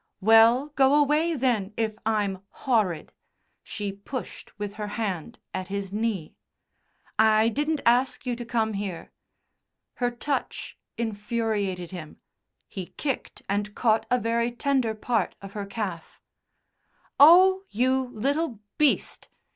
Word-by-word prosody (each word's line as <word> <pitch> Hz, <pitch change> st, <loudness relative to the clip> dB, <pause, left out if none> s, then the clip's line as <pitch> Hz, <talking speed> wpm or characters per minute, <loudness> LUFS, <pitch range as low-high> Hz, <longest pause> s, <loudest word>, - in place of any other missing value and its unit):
"Well, 225 Hz, +6 st, +5 dB
go 275 Hz, -1 st, +4 dB
away, 300 Hz, +3 st, +3 dB
then, 225 Hz, -7 st, 0 dB
if 220 Hz, -2 st, -1 dB
I'm 205 Hz, -4 st, 0 dB, 0.2 s
horrid," 210 Hz, -, +1 dB, 0.5 s
she 205 Hz, -2 st, -5 dB
pushed 205 Hz, +6 st, -8 dB
with 205 Hz, -1 st, -4 dB
her 210 Hz, -, -2 dB
hand 205 Hz, -1 st, -3 dB, 0.2 s
at 185 Hz, -1 st, -4 dB
his 200 Hz, 0 st, -4 dB
knee. 210 Hz, -7 st, -2 dB, 0.9 s
"I 220 Hz, 0 st, +5 dB
didn't 295 Hz, +4 st, -1 dB
ask 245 Hz, +4 st, +2 dB
you 245 Hz, -1 st, -1 dB
to 240 Hz, -, -5 dB
come 225 Hz, -2 st, 0 dB
here." 195 Hz, -4 st, -5 dB, 0.9 s
Her 245 Hz, -1 st, +1 dB
touch 270 Hz, +4 st, -4 dB, 0.2 s
infuriated 210 Hz, -5 st, -2 dB
him; 165 Hz, -5 st, -9 dB, 0.5 s
he 185 Hz, -3 st, -6 dB
kicked 275 Hz, -4 st, -3 dB
and 205 Hz, +1 st, -2 dB
caught 225 Hz, -2 st, +2 dB
a 250 Hz, -, +3 dB
very 235 Hz, 0 st, 0 dB
tender 245 Hz, -2 st, 0 dB
part 220 Hz, -2 st, -1 dB
of 195 Hz, -1 st, -10 dB
her 205 Hz, -2 st, -5 dB
calf. 195 Hz, -6 st, -5 dB, 1.0 s
"Oh! 370 Hz, +6 st, +8 dB
You 255 Hz, +2 st, +1 dB
little 275 Hz, +1 st, -1 dB, 0.2 s
beast!" 300 Hz, -2 st, +1 dB
225 Hz, 125 wpm, -26 LUFS, 200-255 Hz, 1.0 s, Oh